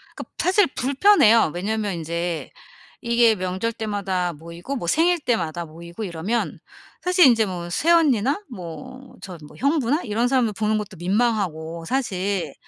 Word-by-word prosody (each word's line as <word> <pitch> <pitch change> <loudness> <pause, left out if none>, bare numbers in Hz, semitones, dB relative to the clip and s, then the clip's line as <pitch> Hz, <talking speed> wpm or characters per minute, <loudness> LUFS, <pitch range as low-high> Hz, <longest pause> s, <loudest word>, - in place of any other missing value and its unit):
그 - - -6
사실 380 +1 +3
불편해요. 260 - +4
왜냐면 205 +2 -2
인제 170 +1 -4 0.5
이게 235 -2 +3
명절 185 +5 -3
때마다 195 -5 -2
모이고 170 - -7
뭐 175 -10 -4
생일 340 - +3
때마다 175 - -2
모이고 170 +6 -9
이러면 190 +6 -3 0.4
사실 360 -1 +5
인제 230 -4 +5
뭐 175 -2 -5
새언니나 295 - +2
뭐 255 +7 -10
저 180 -3 -8
뭐 - - -16
형부나 285 +1 +1
이런 230 +2 0
사람들 245 -5 +1
보는 215 +1 0
것도 210 -2 -6
민망하고 175 -5 -1
사실 195 - -2
215 Hz, 305 characters per minute, -22 LUFS, 175-255 Hz, 0.5 s, 사실